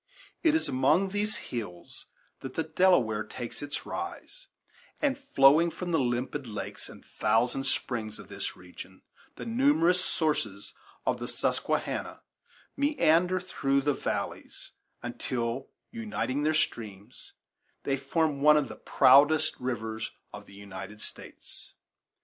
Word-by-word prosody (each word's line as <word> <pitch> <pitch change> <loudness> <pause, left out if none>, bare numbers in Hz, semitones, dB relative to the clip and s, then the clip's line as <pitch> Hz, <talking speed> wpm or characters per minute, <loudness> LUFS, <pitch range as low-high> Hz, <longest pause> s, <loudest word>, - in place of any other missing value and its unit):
It 320 -2 +4
is 320 - +1
among 150 +9 +3
these 205 +2 -1
hills 100 -8 -7 0.3
that 135 -1 -8
the 160 - +1
Delaware 155 - +3
takes 120 +3 -7
its 145 0 -5
rise; 380 +7 -6 0.5
and 280 -2 +2
flowing 165 - +5
from 175 +1 -5
the 165 - +3
limpid 125 +2 -1
lakes 105 -2 -6
and - - -13
thousand 120 +5 +1
springs 110 -4 -2
of - - -11
this - - -5
region 90 +1 -12 0.3
the - - -7
numerous 230 - +3
sources 110 - -2 0.3
of - - +1
the - - -4
Susquehanna - - -2 0.5
meander 185 - +3
through 140 -6 0
the 145 +1 +2
valleys - - -4 0.3
until, 120 +1 -3 0.2
uniting 215 - -2
their 155 +1 +2
streams, 110 - -3 0.5
they 135 - +1
form 140 +1 0
one 150 +1 +7
of 150 - 0
the - - -8
proudest 145 +4 +5
rivers 110 -3 -3 0.2
of - - -9
the 100 - -14
United 100 +1 -8
States. - - -9
140 Hz, 130 wpm, -29 LUFS, 115-175 Hz, 0.5 s, one